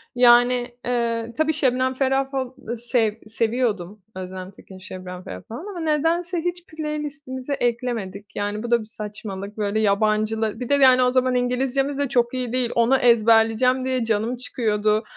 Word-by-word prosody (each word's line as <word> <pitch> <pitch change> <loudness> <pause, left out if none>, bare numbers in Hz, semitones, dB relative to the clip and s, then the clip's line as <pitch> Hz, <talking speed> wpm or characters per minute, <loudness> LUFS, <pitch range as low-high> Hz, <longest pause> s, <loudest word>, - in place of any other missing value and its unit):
Yani, 245 0 +4
eee, 235 -1 -1
tabii 315 0 +2
Şebnem 260 -3 +1
Ferah 270 +1 0
fal 260 -2 -2 0.3
sev 235 -2 +1
seviyordum. 215 -4 -1
Özlem 185 0 -7
Tekin, 190 -1 -14
Şebnem 185 -1 -8
Ferah 90 - -8
falan 255 - -7
ama 365 - -6
nedense 330 +3 0
hiç 350 +1 -3
playlist'imize 295 -3 -5
eklemedik. 230 -6 -3
Yani 205 +1 -2
bu 240 - -5
da 235 - +5
bir 220 - -8
saçmalık, 210 -2 -7
böyle 210 0 0
yabancılı 215 +1 +1
Bir 250 - -5
de - - +3
yani 260 -2 +6
o 250 - +3
zaman 255 0 +2
İngilizcemiz 265 +3 0
de 285 -2 0
çok 240 -2 +1
iyi 250 -2 -3
değil. 255 -2 0
Onu 235 +3 +4
ezberleyeceğim 230 +2 +4
diye 255 -2 0
canım 225 +2 0
çıkıyordu. 215 -3 0
240 Hz, 160 wpm, -23 LUFS, 215-260 Hz, 0.3 s, yani